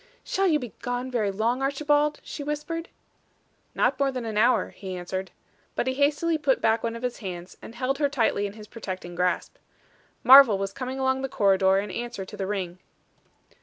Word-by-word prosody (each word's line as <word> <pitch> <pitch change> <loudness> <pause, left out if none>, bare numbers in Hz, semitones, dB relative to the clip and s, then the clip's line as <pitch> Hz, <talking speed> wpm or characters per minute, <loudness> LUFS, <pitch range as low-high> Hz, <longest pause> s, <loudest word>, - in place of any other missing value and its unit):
"Shall 390 0 +1
you 315 -4 +4
be 245 -7 -7
gone 245 +1 -3
very 220 -5 0
long, 225 +6 0
Archibald?" 295 +2 +1
she 290 - -6
whispered. 300 +3 -4 0.9
"Not - - +1
more 275 -1 +2
than 255 -3 -4
an 220 -2 -4
hour," 235 +4 +3
he 190 -2 -7
answered. 185 +1 -4 0.5
But - - 0
he 260 - 0
hastily 295 +4 +1
put 280 -3 +2
back 225 0 +2
one 230 0 -2
of 230 - -8
his 250 -1 -3
hands, 180 -3 -7
and 230 - -11
held 265 +3 -1
her 285 -2 +2
tightly 225 -6 +1
in 200 - -9
his 215 0 -11
protecting 185 -5 -7
grasp. 180 +1 -1 0.7
Marvel 255 -4 +9
was 195 0 -3
coming 260 +2 -5
along 265 0 +1
the 270 - -3
corridor 195 -3 +3
in 200 0 -2
answer 235 -4 -5
to - - -10
the 195 - -3
ring. 185 -3 -3
240 Hz, 195 wpm, -26 LUFS, 195-270 Hz, 0.9 s, Marvel